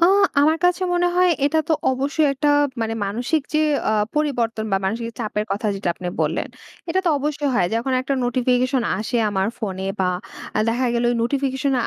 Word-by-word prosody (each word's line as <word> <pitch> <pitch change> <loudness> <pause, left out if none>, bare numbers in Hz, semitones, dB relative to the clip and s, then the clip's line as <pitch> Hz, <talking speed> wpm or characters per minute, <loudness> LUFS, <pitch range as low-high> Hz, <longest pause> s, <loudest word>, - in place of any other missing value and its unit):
আ - - +6 0.4
আমার 310 +3 +4
কাছে 360 +1 +3
মনে 355 0 +2
হয় 365 0 +5
এটা 290 +3 +2
তো - - +3 0.2
অবশ্যই 280 +4 +1
একটা 295 +2 0 0.3
মানে 225 0 -1
মানসিক 240 +9 -1
যে, - - +4 0.3
আ - - +2 0.2
পরিবর্তন 240 -7 0
বা - - +4
মানসিক 230 +4 -2
চাপের 210 -1 -2
কথা 210 +2 -2
যেটা 195 -2 -3
আপনি 180 - -7 0.2
বললেন। 155 +2 -1 0.4
এটা 370 +3 +1
তো - - +5
অবশ্যই 295 0 -1
হয়। 180 - +3
যখন 240 +3 -1
একটা 270 +2 -1
নোটিফিকেশন 250 +1 +1 0.2
আসে 220 +3 -1
আমার 190 -1 0
ফোনে 190 -4 -4
বা 185 - +2 0.4
অ্যা 215 - 0
দেখা 245 +3 +1
গেল 235 0 +1 0.2
নোটিফিকেশন 270 +2 0
250 Hz, 180 wpm, -21 LUFS, 220-290 Hz, 0.4 s, আ